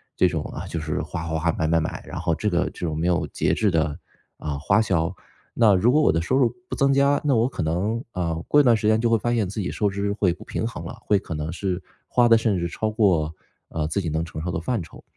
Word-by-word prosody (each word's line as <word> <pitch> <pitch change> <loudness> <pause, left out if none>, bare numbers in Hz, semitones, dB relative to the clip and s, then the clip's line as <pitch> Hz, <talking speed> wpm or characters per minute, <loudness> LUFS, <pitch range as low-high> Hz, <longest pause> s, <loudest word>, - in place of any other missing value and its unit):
这 - - +4
种 - - -2
啊， - - -6
就 80 - -4
是 80 -1 -2
花 80 - -5
花 80 0 -1
花、 85 +1 +1
买 80 - -1
买 85 +1 +3
买， 80 - -4
然 - - -5
后 85 - 0
这 95 +7 -1
个 85 0 +1
这 90 - -5
种 75 -1 -3
没 85 - -1
有 90 -1 +1
节 - - 0
制 105 -2 +2
的， 80 -3 0 0.4
啊， 75 -2 -4
花 105 +9 +3
销， 90 -3 0 0.4
那 110 -5 +5
如 115 +7 +4
果 155 +2 +4
我 - - +4
的 80 - +1
收 125 +10 0
入 125 -4 +3 0.2
不 - - -4
增 140 0 +3
加， 140 +1 +3
那 140 -4 +2
我 115 +2 +3
可 130 - -5
能， 100 - -1
啊， 85 -2 -1
过 145 - +5
一 - - +2
段 120 -3 +5
时 105 -1 -1
间 110 0 +4
就 120 - +2
会 115 - +4
发 120 +2 0
现 105 -5 +1
自 105 +3 -5
己 90 - -2
收 105 -1 0
支 100 +1 -2
会 95 -5 +1
不 - - -12
平 - - -3
衡 115 - -7
了， 120 - -7
会 100 -2 +3
可 80 - -6
能 75 +2 -4
是 95 -1 -3 0.2
花 120 -1 +3
的 115 - +7
甚 110 -4 +1
至 85 0 -1
超 110 +5 -2
过， 90 -8 +2 0.4
呃， 75 -1 -2
自 100 +5 -1
己 85 - -3
能 80 +2 -1
承 80 -1 -7
受 90 +1 -3
的 80 - -2
范 110 +4 -1
畴。 - - -14
95 Hz, 305 characters per minute, -24 LUFS, 80-110 Hz, 0.4 s, 的